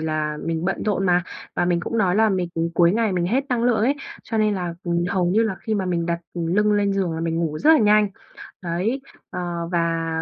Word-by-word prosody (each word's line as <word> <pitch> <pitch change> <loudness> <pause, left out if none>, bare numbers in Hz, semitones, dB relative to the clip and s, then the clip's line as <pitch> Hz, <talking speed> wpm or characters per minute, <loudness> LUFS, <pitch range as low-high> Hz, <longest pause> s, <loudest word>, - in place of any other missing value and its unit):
là 155 -1 -2
mình 165 0 -2
bận 190 - -1
rộn 195 -2 0
mà, 180 0 +3 0.3
và 175 - +1
mình 175 -1 +1
cũng 230 +6 -3
nói 190 -1 +2
là 220 0 +4
mình 185 -3 0 0.3
cuối 170 +1 +4
ngày 220 -2 +1
mình 175 -1 0
hết 260 +9 +1
năng 245 -2 0
lượng 245 -2 +3
ấy, 250 +6 +2 0.3
cho 225 - -3
nên 215 -1 +2
là, 175 -2 -3
ừm, 170 0 0
hầu 180 -1 +1
như 205 +6 +3
là 215 -4 -1
khi 220 -2 -2
mà 195 -2 -1
mình 170 -2 -1
đặt 170 0 -1
lưng 185 +5 +1
lên 200 -1 +2
giường 190 -4 0
là 160 - -4
mình 165 0 -1
ngủ 155 -2 -2
rất 305 - +4
là 315 - +6
nhanh. 210 -1 +4 0.5
Đấy, 185 +10 -1 0.3
ờ, 175 -2 -4
và 165 -1 0
180 Hz, 240 wpm, -22 LUFS, 170-210 Hz, 0.5 s, là